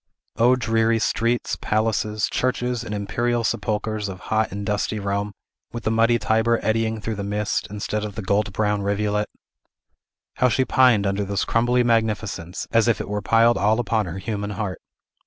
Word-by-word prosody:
O 120 +2 +5
dreary 115 -1 +1
streets, 115 +2 0
palaces, 110 0 0
churches, 125 -1 -1
and 110 - -7
imperial 115 +4 -1
sepulchres 105 0 -1
of 95 -1 -7
hot 110 -1 +1
and 100 +1 -5
dusty 105 +1 -1
Rome, 100 0 -2 0.4
with 120 -1 -5
the 110 - 0
muddy 115 +1 +3
Tiber 115 +1 +2
eddying 110 0 0
through 110 +1 -3
the 100 -1 -4
midst, 105 +1 -1
instead 105 +1 -3
of 105 -2 -5
the 110 - -5
gold 100 +2 +1
brown 105 0 0
rivulet! 105 +1 0 1.1
How 125 - +4
she 130 +3 +1
pined 125 -7 +4
under 100 +1 0
this 100 0 -1
crumbly 120 +2 +2
magnificence, 110 -6 -1
as 115 0 +3
if 115 - +2
it - - -5
were 105 0 -2
piled 115 +3 +4
all 110 +3 +2
upon 110 -4 0
her 85 +2 -5
human 100 +1 -4
heart! 100 -4 -4
110 Hz, 175 wpm, -23 LUFS, 100-115 Hz, 1.1 s, O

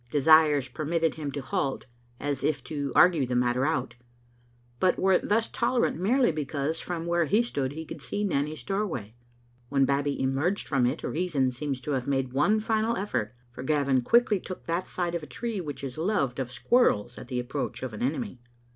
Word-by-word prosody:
Desires 150 -1 +5
permitted 160 +4 -1
him 150 -3 -5
to 140 -1 -5
halt, 145 -4 -2 0.3
as 140 -2 -2
if 145 -4 0
to 145 -3 -3
argue 175 -5 +6
the 125 - -1
matter 125 +2 +2
out, 130 -6 -1 0.9
but 185 - +3
were 190 -1 +4
thus 220 +2 +1
tolerant 235 -7 0
merely 240 +4 +3
because 150 +1 -2
from 170 -2 -4
where 170 0 +2
he 210 +10 +3
stood 140 - -2
he 160 +2 -6
could - - -8
see 205 - -3
Nanny's 150 -5 -1
doorway. 185 - -3 0.6
When 140 -1 +3
Babbie 140 +1 0
emerged 140 +9 0
from 135 -4 +2
it 135 +6 -3
reason 150 -7 0
seems 135 +1 -3
to 150 - -4
have 130 -2 -1
made 135 -2 0
one 190 +11 +3
final 220 +1 0
effort, 130 - -2 0.2
for 120 - -8
Gavin 140 -2 +2
quickly 225 - +3
took 185 0 -8
that 170 +2 -2
side 175 -2 -2
of 170 - -2
a 150 - -9
tree 230 -5 -3
which 145 -4 -6
is 135 +2 -5
loved 160 - 0
of 125 -2 -3
squirrels 125 - +2
at - - -10
the 125 -1 -2
approach 130 +2 -4
of 130 -4 -4
an 105 - -7
enemy. 145 - -2
150 Hz, 190 wpm, -27 LUFS, 135-180 Hz, 0.9 s, argue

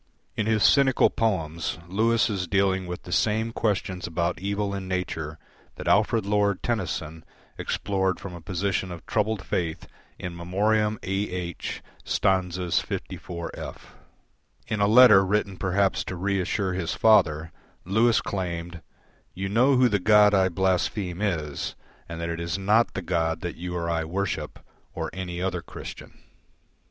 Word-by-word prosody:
In 110 - -1
his 110 -2 +2
cynical 135 -2 +5
poems, 85 -7 -1
Lewis 110 +5 +2
is 95 -5 -2
dealing 95 0 +1
with 90 0 -6
the 90 - -9
same 110 +4 +1
questions 95 -5 -1
about 85 +1 -1
evil 100 +1 -2
in 95 -1 -4
nature 80 -4 -3 0.4
that - - -7
Alfred 110 +1 +3
Lord 100 -1 +1
Tennyson 80 -8 -3 0.4
explored 95 -2 -1
from 100 - -7
a 85 - -9
position 95 +1 -2
of 85 -2 -9
troubled 105 -2 -1
faith 80 -3 -2 0.3
in 90 - -5
"In - - -10
Memoriam 105 +5 +1
A. 95 - -3 0.2
H." 90 -2 -5 0.2
(Stanzas 90 -3 +1
54f). 85 -1 -6 0.9
In 110 - -2
a 100 - +4
letter 115 -3 +8
written 100 0 0
perhaps 95 +2 +1
to 95 - -5
reassure 95 +1 -1
his 90 -2 -2
father, 80 -8 +4 0.3
Lewis 110 +5 +3
claimed, 85 -3 -4 0.5
"You 95 +1 -3
know 125 +7 +4
who 125 0 +5
the 105 -3 +1
God 105 +1 +6
I 95 -1 +4
blaspheme 95 +1 0
is 80 -8 -2 0.3
and 85 0 -6
that 85 0 -3
it 85 0 -3
is 85 +1 -2
not 105 +4 +2
the 95 - -3
God 80 -1 0
that 85 - -4
you 90 +1 -5
or 85 -1 -2
I 80 -1 0
worship, 95 +3 -3 0.4
or - - -3
any 90 -1 -4
other 90 -2 -1
Christian." - - -10
95 Hz, 150 wpm, -26 LUFS, 85-105 Hz, 0.9 s, letter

